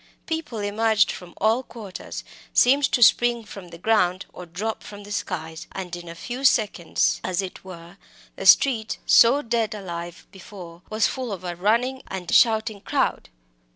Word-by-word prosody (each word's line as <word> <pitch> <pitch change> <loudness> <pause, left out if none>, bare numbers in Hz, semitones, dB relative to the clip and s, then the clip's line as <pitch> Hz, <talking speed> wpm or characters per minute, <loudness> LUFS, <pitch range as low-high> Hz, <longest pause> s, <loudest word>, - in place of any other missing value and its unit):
People 320 -7 -4
emerged 220 +1 +2
from 175 -1 -10
all 220 +4 +2
quarters, 220 -7 -9 0.3
seemed 275 +3 +5
to 245 - +3
spring 240 0 +4
from 195 -3 -10
the 170 -1 -11
ground 185 -2 +1
or 180 - -10
drop 205 +7 -4
from 205 0 -11
the 205 - -11
skies, 165 -5 -5
and 180 -2 -5
in 175 -1 -9
a 170 - -8
few 245 +9 -6
seconds, 210 -9 +2
as 185 -2 -2
it 190 -2 -5
were, 175 -1 -11 0.4
the - - -3
street, 230 -6 +5
so 265 +5 +6
dead 230 -2 -1
alive 175 -3 -7
before, 180 -3 -12
was 215 +1 +1
full 255 -4 -3
of 185 -2 -6
a 175 -1 -4
running 235 +8 +1
and 180 -3 -5
shouting 220 -3 +3
crowd. - - -1
205 Hz, 165 wpm, -24 LUFS, 180-230 Hz, 0.4 s, so